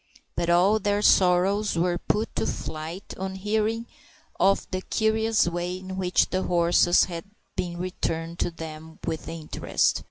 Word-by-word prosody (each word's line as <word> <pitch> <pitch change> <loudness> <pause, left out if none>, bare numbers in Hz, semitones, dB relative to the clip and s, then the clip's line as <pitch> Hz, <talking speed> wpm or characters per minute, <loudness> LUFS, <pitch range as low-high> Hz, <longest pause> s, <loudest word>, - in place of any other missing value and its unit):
But 170 0 -1
all 185 +5 +4
their 205 0 0
sorrows 190 +3 +4
were 175 +1 +1
put 215 +4 -1
to - - 0
flight 160 +5 -5
on 190 0 -3
hearing 215 +3 -1 0.5
of 195 0 +3
the 185 -1 -2
curious 220 0 +1
way 175 +1 -2
in 190 0 -7
which 180 -1 +1
the 185 - 0
horses 175 0 +4
had 170 -1 -5 0.3
been 175 -1 -3
returned 170 -2 -3
to - - +1
them 160 -1 -9
with 160 - -3
interest. 160 -2 0
180 Hz, 150 wpm, -26 LUFS, 170-200 Hz, 0.5 s, all